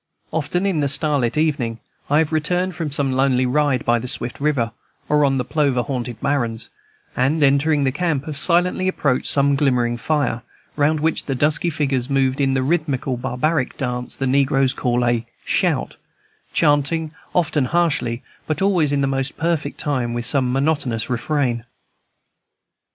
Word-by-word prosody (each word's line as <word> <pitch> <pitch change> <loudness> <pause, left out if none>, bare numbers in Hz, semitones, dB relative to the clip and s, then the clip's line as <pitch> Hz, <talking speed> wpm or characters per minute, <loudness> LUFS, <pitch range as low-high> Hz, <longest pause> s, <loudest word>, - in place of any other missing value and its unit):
Often 165 +4 -1
in 190 -6 +1
the 140 -1 +1
starlit 145 -4 0
evening, 140 -8 0 0.3
I 145 - +3
have 160 0 +2
returned 180 +4 0
from 165 -4 -4
some 140 -1 +1
lonely 130 -1 +2
ride 140 -1 +1
by 120 0 +3
the 125 - -6
swift 125 -2 -4
river, 140 -6 0 0.4
or 150 0 +3
on 135 -1 +2
the 125 - -1
plover 140 -5 +1
haunted 125 -4 -4
barrens, 120 -6 -1 0.4
and, 145 +5 +2
entering 140 +2 +3
the 135 - +2
camp, 150 -2 -1
have 155 - -5
silently 180 +4 +2
approached 140 -8 0
some 140 0 +3
glimmering 125 -4 +1
fire, 140 -2 0 0.3
round 150 +1 +2
which 160 +1 0
the 135 - -2
dusky 150 +5 +2
figures 140 -5 -1
moved 135 0 +1
in 135 -1 +2
the 130 - +1
rhythmical 140 -4 0
barbaric 130 +3 -1
dance 125 -2 -3
the 135 - -1
negroes 135 0 +2
call 120 0 0
a 120 -1 +1 0.2
"shout," - - 0 0.5
chanting, 150 +1 +1 0.2
often 155 -5 +2
harshly, 130 -6 0 0.2
but 155 -1 -1
always 180 -7 +2
in 140 -1 +1
the - - +2
most 135 0 -2
perfect 165 -2 -1
time, 120 -5 -1
some 125 0 +1
monotonous 135 -5 0
refrain. 125 -1 0
140 Hz, 160 wpm, -21 LUFS, 125-155 Hz, 0.5 s, I